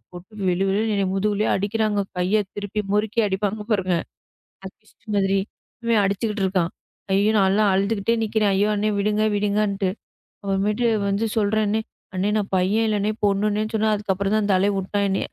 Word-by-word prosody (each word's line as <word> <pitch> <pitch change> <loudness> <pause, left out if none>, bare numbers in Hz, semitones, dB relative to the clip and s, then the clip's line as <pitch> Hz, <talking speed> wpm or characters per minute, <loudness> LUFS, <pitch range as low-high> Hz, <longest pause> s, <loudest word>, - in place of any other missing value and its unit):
விட்டு 195 +4 -9
வெழு, 180 +2 +1
வெழுனு 215 +3 0
என்ன 200 - +1
முதுகுலே 210 +2 0
அடிக்குறாங்க. 210 +1 0 0.2
கைய 195 +4 +2
திருப்பி 205 +1 -3
முறுக்கி 215 +2 +1
அடிப்பாங்க 205 +2 -2
பாருங்க. 185 -4 +1 0.7
அது 215 +3 -12
மாதிரி 195 0 +2 0.7
அடிச்சுகிட்டு 205 +2 -1
இருக்கான். 185 -2 0 0.4
ஐயோ 200 +2 +3
நான் 195 +1 +3
அழுதுகிட்டே 200 +3 +1
நிக்கிறேன். 215 -1 +1
ஐயோ 200 +2 +2
அண்ணே 210 +1 0
விடுங்க 210 +1 +1
விடுங்கன்ட்டு. 205 -1 0 0.5
அப்புறமேட்டு 205 +4 0 0.2
வந்து 200 +3 0
சொல்றேன்னு, 215 0 +1 0.4
அண்ணே 190 +3 0
நான் 205 -2 -2
பையன் 195 +5 +2
இல்ல 210 -1 0
பொண்ணுன்னே 205 +1 +1
சொன்னேன். 220 0 +2
அதுக்கு 205 -1 -1
அப்புறம் 195 +2 -1
தான் 215 - +2
அந்த 200 -2 +3
ஆளே 195 +2 +2
விட்டான் 200 +1 -1
என்னய. 190 - -1
205 Hz, 155 wpm, -23 LUFS, 195-215 Hz, 0.7 s, ஐயோ